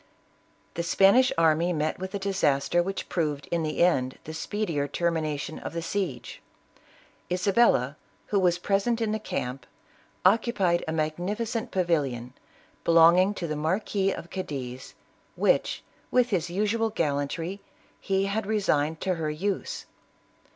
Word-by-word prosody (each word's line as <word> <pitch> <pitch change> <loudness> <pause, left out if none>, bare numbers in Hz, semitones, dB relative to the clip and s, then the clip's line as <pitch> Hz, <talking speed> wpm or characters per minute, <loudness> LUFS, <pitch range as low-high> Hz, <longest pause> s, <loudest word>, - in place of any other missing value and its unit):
The 170 - -2
Spanish 195 +9 +5
army 165 +1 +3
met 155 +1 -1
with 190 +2 -5
a - - +1
disaster 175 -5 +1
which 195 +2 -4
proved 150 -4 -1
in 170 -1 +1
the 155 +1 +1
end 130 -7 +2
the 160 - -7
speedier 160 -4 -2
termination 155 -1 -2
of - - -6
the 170 - -3
siege. 170 -8 -4 0.9
Isa 185 +2 0
bella, 150 - +3 0.4
who 200 - +4
was 175 -2 +3
present 200 +6 0
in 225 -2 0
the 220 - -1
camp, 125 -10 -4 0.6
occupied 195 -4 +3
a - - -1
mag 155 -1 -1
nificent 215 +5 -3
pavilion, 140 -10 -1 0.5
belonging 170 +4 +5
to 175 - -4
the 155 -2 -2
Marquis 190 +5 0
of 170 - -7
Cadiz, 130 -8 -6 0.4
which, - - +1 0.3
with 250 -1 +2
his 175 -3 0
usual 215 +5 0
gallantry, 165 +2 -2 0.4
he 195 0 0
had 200 +1 -2
resigned 160 -8 +1
to 190 - +1
her 160 -3 -2
use. 190 +6 -3
175 Hz, 140 wpm, -27 LUFS, 155-200 Hz, 0.9 s, Spanish